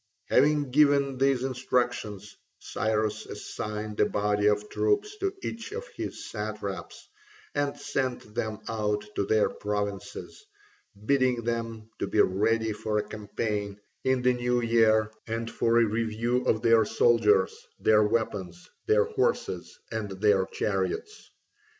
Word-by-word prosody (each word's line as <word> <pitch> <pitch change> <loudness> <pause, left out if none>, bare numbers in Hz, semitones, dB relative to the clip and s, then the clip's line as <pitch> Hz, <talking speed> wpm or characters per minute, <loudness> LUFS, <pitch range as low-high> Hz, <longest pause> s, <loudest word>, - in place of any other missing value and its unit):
Having 145 0 +3
given 140 -2 +4
these 135 -2 +2
instructions, 120 -6 -2 0.2
Cyrus 110 0 -1
assigned 105 0 -5
a 105 - +5
body 105 0 +1
of 105 0 +2
troops 420 - 0
to 390 -2 -1
each 230 - -5
of 470 +2 -5
his - - -6
satraps, 105 -4 -6 0.5
and 145 -1 -1
sent 125 -5 -3
them 110 -2 -3
out 105 -2 -1
to 100 - -1
their 110 -1 +3
provinces, 105 - -4 0.6
bidding 130 -2 +2
them 115 -1 -3
to - - -1
be - - 0
ready 110 +3 +2
for 105 0 -2
a 105 - +1
campaign 105 -1 -3 0.2
in 130 -1 +1
the 125 0 +4
new 125 0 0
year 110 -2 +3 0.2
and 115 +1 -3
for 115 0 +2
a 115 - +6
review 115 +3 -1
of 110 +1 +1
their 115 -1 +6
soldiers, 105 -3 +3 0.2
their 110 -1 +5
weapons, 100 -5 -1 0.2
their 455 +2 +5
horses, 445 +1 -1
and 110 -2 -3
their 100 -2 +3
chariots. 100 - -3
110 Hz, 130 wpm, -28 LUFS, 105-125 Hz, 0.6 s, a